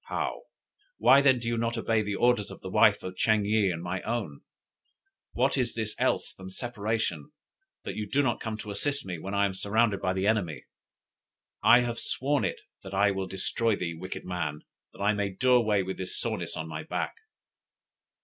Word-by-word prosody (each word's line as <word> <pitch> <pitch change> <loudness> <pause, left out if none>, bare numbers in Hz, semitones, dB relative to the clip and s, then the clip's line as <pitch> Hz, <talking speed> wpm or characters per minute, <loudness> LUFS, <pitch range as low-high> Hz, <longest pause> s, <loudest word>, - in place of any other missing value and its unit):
Paou: - - -2 0.6
"Why 140 - +6
then 135 -2 +5
do 115 -1 -5
you 115 0 0
not 115 +1 -1
obey 115 -1 +1
the 105 -1 -2
orders 120 -2 +2
of - - -10
the 95 - -7
wife 105 -1 +5
of 95 0 -6
Ching 110 +1 +2
yih 105 -1 +3
and 85 -1 -5
my 90 +1 -3
own? 110 -11 -3 0.9
What 135 +2 +2
is 120 -2 -1
this 110 -2 -3
else - - +1
than 95 0 -10
separation, 110 - -3 0.5
that - - -5
you 105 -1 -4
do 145 +5 +2
not 120 -3 0
come 110 -1 -4
to 105 -1 -7
assist 140 +8 -1
me, 90 -3 -5
when 95 +5 -5
I 100 0 +3
am 100 - -1
surrounded 100 +1 +1
by 95 - +1
the 95 +1 -1
enemy? 100 -8 0 1.0
I 120 - +8
have 120 -1 -2
sworn 140 +2 0
it - - -2 0.2
that 95 0 -7
I 100 +1 +4
will 95 -1 -3
destroy 105 +4 0
thee, 90 -3 -3
wicked 90 +3 -7
man, 80 -5 -3 0.3
that - - -7
I 105 +1 +4
may 100 -1 -1
do 125 +7 +1
away 110 -5 +3
with 95 +1 -5
this 95 -1 -5
soreness - - -3
on 80 - -4
my 80 - -5
back." - - -3
105 Hz, 200 wpm, -28 LUFS, 95-115 Hz, 1.0 s, I